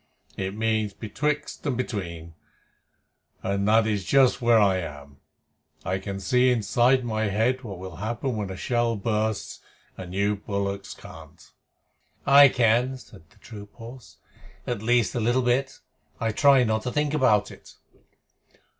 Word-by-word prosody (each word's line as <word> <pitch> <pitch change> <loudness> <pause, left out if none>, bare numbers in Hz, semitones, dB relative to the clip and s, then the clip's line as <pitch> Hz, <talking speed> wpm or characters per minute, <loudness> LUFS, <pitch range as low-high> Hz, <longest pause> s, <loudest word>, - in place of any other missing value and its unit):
It 95 +1 -4
means 110 -2 -1
betwixt 145 +7 -3
and 130 -4 -1
between, 85 -9 -5 1.1
and 100 +1 -1
that 110 +1 +4
is 105 -3 -1
just 130 +1 +3
where 120 -1 +4
I 100 -3 +3
am. 70 -5 -8 0.7
I 95 +1 -1
can 95 0 -6
see 125 +5 +2
inside 120 +2 +2
my 110 -1 -1
head 110 +6 0
what 100 -5 -7
will 95 -1 -9
happen 120 +4 -3
when 105 -3 -4
a 95 - -6
shell 120 0 0
bursts, 110 0 -2 0.4
and 90 -1 -9
you 100 +2 0
bullocks 100 0 -4
can't." - - -14 0.7
"I 140 0 +8
can," 125 +2 +2
said 95 -10 -17
the - - -26
troop 105 -3 -12
horse. 120 +2 -12 0.5
"At 120 -4 -3
least 115 -3 +2
a - - -2
little 120 +3 +1
bit. 130 +2 0 0.4
I 115 -1 0
try 135 +2 +5
not 110 -2 0
to 125 - -4
think 150 +2 -1
about 120 -8 +2
it." - - -15
110 Hz, 150 wpm, -25 LUFS, 100-125 Hz, 1.1 s, I